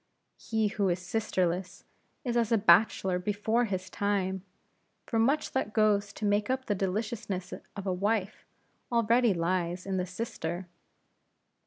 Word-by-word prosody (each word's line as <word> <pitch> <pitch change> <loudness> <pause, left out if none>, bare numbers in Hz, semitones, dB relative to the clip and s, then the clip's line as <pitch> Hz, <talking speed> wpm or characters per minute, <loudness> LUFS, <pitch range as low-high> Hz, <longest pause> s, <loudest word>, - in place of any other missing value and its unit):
He 220 -2 0
who 200 -2 0
is 175 - +1
sisterless, 185 -2 -1 0.4
is 240 -2 -1
as 235 -1 +2
a 230 - +5
bachelor 190 -1 +4
before 210 +5 +1
his 190 -3 -3
time. 190 -2 -1 0.6
For 225 - 0
much 270 +7 +2
that 240 -5 -1
goes 205 -2 +3
to 215 - -4
make 205 +2 +2
up 260 0 -1
the 205 - +1
deliciousness 195 -1 -3 0.2
of 200 -1 -6
a 190 - 0
wife, 205 +2 -1 0.4
already 235 -2 +3
lies 175 +1 -1
in 195 -1 -1
the 180 0 -1
sister. 180 -3 -4
205 Hz, 145 wpm, -29 LUFS, 185-225 Hz, 0.6 s, a